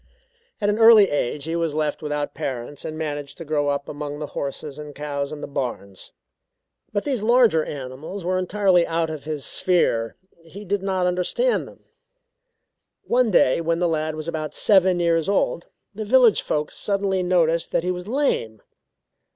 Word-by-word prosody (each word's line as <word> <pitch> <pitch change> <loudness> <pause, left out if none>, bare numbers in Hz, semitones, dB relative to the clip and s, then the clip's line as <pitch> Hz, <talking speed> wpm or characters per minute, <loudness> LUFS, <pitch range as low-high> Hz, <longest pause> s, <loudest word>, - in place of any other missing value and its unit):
At 205 - 0
an 210 +2 +1
early 225 -3 +7
age 145 0 -1
he 165 +2 -2
was 165 -3 -1
left 155 0 -1
without 150 -1 -3
parents 130 +2 -5
and 155 - -5
managed 145 -3 -4
to 165 - -8
grow 145 -1 0
up 140 0 -1
among 145 0 -5
the 150 - -4
horses 140 +1 -5
and 150 -1 -9
cows 140 -1 -4
in 150 -1 -7
the - - -5
barns. 120 -8 -5 0.8
But 205 -1 -1
these 265 -6 -1
larger 230 -8 +4
animals 145 +8 -7
were 185 +1 +1
entirely 185 -2 +2
out 165 -1 -1
of 155 -2 -7
his 150 -3 -4
sphere 115 - +1 0.3
he 195 +6 -11
did 200 +1 -1
not 190 -2 0
understand 180 - 0
them. - - -16 1.2
One 250 -1 +2
day 170 -6 +3
when 165 0 0
the 175 0 +1
lad 155 -1 -1
was 155 0 -6
about 155 -2 -4
seven 190 -3 +4
years 165 0 +1
old, 190 -3 0 0.3
the 215 +2 -5
village 240 0 +5
folks 150 0 -2
suddenly 195 -2 0
noticed 170 -2 +1
that - - +1
he 180 - 0
was 180 +1 -6
lame. 220 - -1
165 Hz, 175 wpm, -23 LUFS, 145-195 Hz, 1.2 s, early